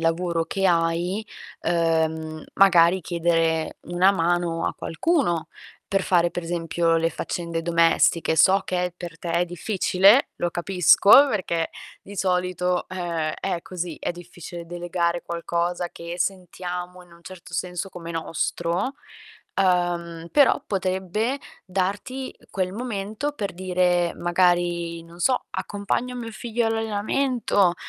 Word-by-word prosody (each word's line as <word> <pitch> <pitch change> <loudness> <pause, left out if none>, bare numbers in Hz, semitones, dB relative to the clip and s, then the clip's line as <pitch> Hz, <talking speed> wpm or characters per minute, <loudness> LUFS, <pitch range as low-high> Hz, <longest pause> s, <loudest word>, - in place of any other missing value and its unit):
lavoro 165 0 0
che 195 +3 0
hai, 175 +4 +1 0.4
uhm, 160 -2 0
magari 185 -2 +5
chiedere 165 -1 0
una 175 +3 +3
mano 175 -2 0
a - - -1
qualcuno 175 - 0 0.4
per 195 -1 +1
fare, 175 -2 +3
per 175 - -3
esempio, 165 0 0
le 165 0 +2
faccende 170 -1 -4
domestiche. 165 -1 +3
So 190 +5 +5
che 180 -1 -1
per 170 -2 -8
te 170 - -5
è 170 +1 +2
difficile, 190 - +3
lo 175 - -1
capisco, 180 +3 +3 0.2
perchè 170 -7 -1 0.3
di 200 0 -11
solito, 180 -1 0
ehm, 170 -4 -2
è 185 -3 -2
così, 175 -3 -5
è - - -1
difficile 175 -1 -9
delegare 175 0 -1
qualcosa 170 +1 -2
che 170 +1 -7
sentiamo, 180 -1 -4
in 175 - -21
un 170 - -18
certo 185 0 -12
senso, 180 +1 -3
come 170 -1 -8
nostro. 170 - -2 0.6
Uhm, 175 -3 0
però 285 -2 +5
potrebbe 190 +6 -1 0.3
darti 200 +8 -3
quel 185 -1 -2
momento 220 +4 -3
per 205 -7 -3
dire, 180 -1 +1
magari, 175 -1 +1
non 170 +1 -14
so: 255 +7 +2
"Accompagno 210 +5 -3
mio 230 -2 -6
figlio 235 +1 -2
all'allenamento!" 225 -2 +1
175 Hz, 125 wpm, -24 LUFS, 170-195 Hz, 0.6 s, magari